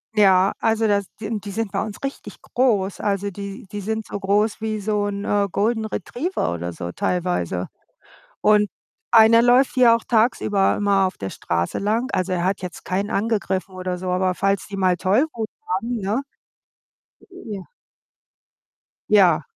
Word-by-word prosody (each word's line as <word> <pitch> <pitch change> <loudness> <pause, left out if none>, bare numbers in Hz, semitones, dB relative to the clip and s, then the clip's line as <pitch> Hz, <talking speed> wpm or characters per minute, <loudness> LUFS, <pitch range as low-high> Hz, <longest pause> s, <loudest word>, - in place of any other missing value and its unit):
Ja, 195 -2 +5
also 225 0 +2
das 200 -1 +1
die 215 - -5
n 220 -1 -2
die 200 0 -8
sind 225 0 -3
bei - - -1
uns 215 -2 -6
richtig 275 - -6
groß. 210 -7 0
Also 200 0 -1
die 200 0 -8
die 205 -1 -5
sind 220 +2 -3
so 200 - -5
groß 205 +3 +1
wie 215 -1 -2
so 205 0 0
'n, 200 0 -3
äh, 205 -1 +1
Golden 220 +1 0
Retriever 245 - -3
oder 85 0 -4
so 85 0 -6
teilweise. 165 - -1 0.7
Und 210 -1 +4 0.4
einer 230 0 +7
läuft 245 +2 +4
hier 240 -3 +6
auch 230 - -4
tagsüber 220 -4 +2
immer 200 -2 +2
auf - - -8
der 95 -1 -5
Straße 85 0 -2
lang. 225 +6 0
Also 185 0 -1
er 175 -1 -1
hat 190 +1 0
jetzt 180 -1 -7
keinen 200 +3 -2
angegriffen 195 -4 -1
oder 185 -1 -4
so, 185 0 -4
aber 185 0 +1
falls 195 0 0
die 205 - -6
mal 185 -2 +2
Tollwut 220 - 0 0.2
haben, 225 +6 -1
ne? 205 +7 -1 1.1
Ja. 215 - -8 1.5
Ja. 175 -7 +5
205 Hz, 165 wpm, -22 LUFS, 185-220 Hz, 1.5 s, einer